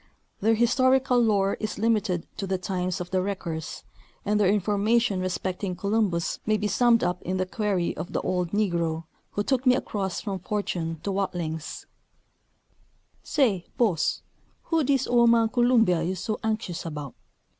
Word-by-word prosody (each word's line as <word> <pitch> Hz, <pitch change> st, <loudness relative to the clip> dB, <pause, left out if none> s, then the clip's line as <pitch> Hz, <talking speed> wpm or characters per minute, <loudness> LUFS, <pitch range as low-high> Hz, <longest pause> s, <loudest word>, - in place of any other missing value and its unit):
Their 225 Hz, +2 st, +3 dB
historical 255 Hz, +2 st, +3 dB
lore 200 Hz, -4 st, +2 dB
is 215 Hz, -, -3 dB
limited 210 Hz, -5 st, +1 dB
to 195 Hz, -, -3 dB
the 190 Hz, 0 st, 0 dB
times 185 Hz, -1 st, -2 dB
of 180 Hz, 0 st, -6 dB
the 185 Hz, -1 st, +2 dB
wreckers, 175 Hz, -5 st, -4 dB, 0.4 s
and 210 Hz, +1 st, +2 dB
their 200 Hz, -3 st, +4 dB
information 210 Hz, +2 st, +2 dB
respecting 185 Hz, 0 st, -2 dB
Columbus 200 Hz, -3 st, 0 dB
may 215 Hz, 0 st, +2 dB
be 210 Hz, 0 st, -1 dB
summed 235 Hz, +1 st, +3 dB
up 180 Hz, 0 st, -1 dB
in 185 Hz, +1 st, -2 dB
the 185 Hz, -, 0 dB
query 195 Hz, -2 st, -1 dB
of 165 Hz, +3 st, -6 dB
the -, -, -1 dB
old 180 Hz, -2 st, -1 dB
negro 170 Hz, -5 st, 0 dB, 0.3 s
who 205 Hz, -, 0 dB
took 260 Hz, +2 st, 0 dB
me 250 Hz, -, +7 dB
across 195 Hz, -7 st, -2 dB
from 195 Hz, -3 st, -4 dB
Fortune 170 Hz, -4 st, -3 dB
to 200 Hz, -, -1 dB
Watlings: 175 Hz, -5 st, -3 dB, 0.7 s
" -, -, -44 dB, 0.7 s
Say, 220 Hz, -, +1 dB
boss, 205 Hz, -10 st, +1 dB, 0.4 s
who 330 Hz, -, +1 dB
is 290 Hz, -, 0 dB
dis 270 Hz, -2 st, +2 dB
ole 240 Hz, -1 st, +4 dB
man 230 Hz, -1 st, +4 dB
Columbia 230 Hz, -7 st, +3 dB
you 175 Hz, +3 st, -1 dB
is 185 Hz, -, -6 dB
so 215 Hz, +3 st, -3 dB
anxshus 215 Hz, -6 st, -2 dB
about? 150 Hz, -5 st, -6 dB
200 Hz, 165 wpm, -26 LUFS, 180-225 Hz, 0.7 s, me